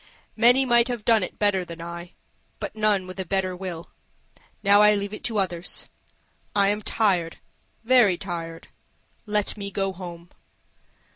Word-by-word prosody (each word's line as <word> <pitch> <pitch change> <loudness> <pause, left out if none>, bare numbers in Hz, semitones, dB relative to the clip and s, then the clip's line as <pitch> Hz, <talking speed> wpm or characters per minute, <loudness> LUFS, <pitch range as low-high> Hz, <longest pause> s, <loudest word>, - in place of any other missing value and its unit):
Many 250 +3 +5
might 240 -1 +4
have 240 -4 -4
done 225 -2 +4
it 185 - -5
better 205 -3 +1
than 170 -1 -10
I 170 +1 -8 0.5
but - - -5
none 210 -3 +1
with 185 +1 -9
a - - 0
better 185 0 -1
will. 180 -3 -7 0.7
Now 200 0 +6
I 210 0 +6
leave 200 0 -3
it 215 - -8
to 225 -3 -2
others; 180 -3 -2 0.7
I 200 -1 +4
am 210 +1 -1
tired, 185 -8 0 0.5
very 225 -6 +5
tired. 165 -4 -6 0.6
Let 210 0 0
me 200 -1 -5
go 195 0 -1
home." 175 -1 -9
195 Hz, 155 wpm, -25 LUFS, 180-210 Hz, 0.7 s, Now